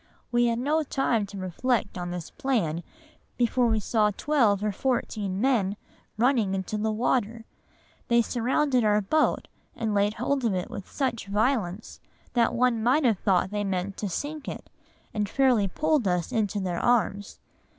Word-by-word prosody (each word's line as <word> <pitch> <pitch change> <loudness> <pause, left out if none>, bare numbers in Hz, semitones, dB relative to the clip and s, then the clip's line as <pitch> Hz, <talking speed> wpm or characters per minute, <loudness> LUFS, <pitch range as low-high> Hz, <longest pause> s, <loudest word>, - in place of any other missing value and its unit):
We 240 0 +3
had 230 -1 0
no 295 +6 +1
time 250 -7 0
to 200 0 -9
reflect 200 +5 -1
on 175 -1 -4
this 175 -2 -6
plan 225 - -1 0.6
before 245 0 +2
we 220 -1 +2
saw 210 +1 +2
twelve 210 -3 +1
or 210 - +1
fourteen 205 -4 -2
men 210 -6 +1 0.4
running 225 -5 +2
into 190 +2 -3
the 220 +1 0
water,—they 235 +1 -2
surrounded 250 +2 +1
our 210 -1 +3
boat 300 +10 +1 0.3
and 225 -3 -2
laid 205 +1 +2
hold 280 +1 -1
of 220 -5 +1
it 180 - -3
with 195 - -7
such 245 -7 -2
violence, 210 -2 -1 0.3
that 235 -1 +2
one 240 -2 +2
might 260 +6 +3
have 220 -6 +3
thought 190 -1 +1
they 205 0 -1
meant 195 0 -2
to 205 - -3
sink 290 - -5
it, - - -7 0.4
and 210 -2 -1
fairly 250 -6 +3
pulled 300 - +1
us 180 +1 0
into 215 -4 0
their 180 -3 -2
arms.... 210 -4 +1
220 Hz, 160 wpm, -26 LUFS, 200-250 Hz, 0.6 s, We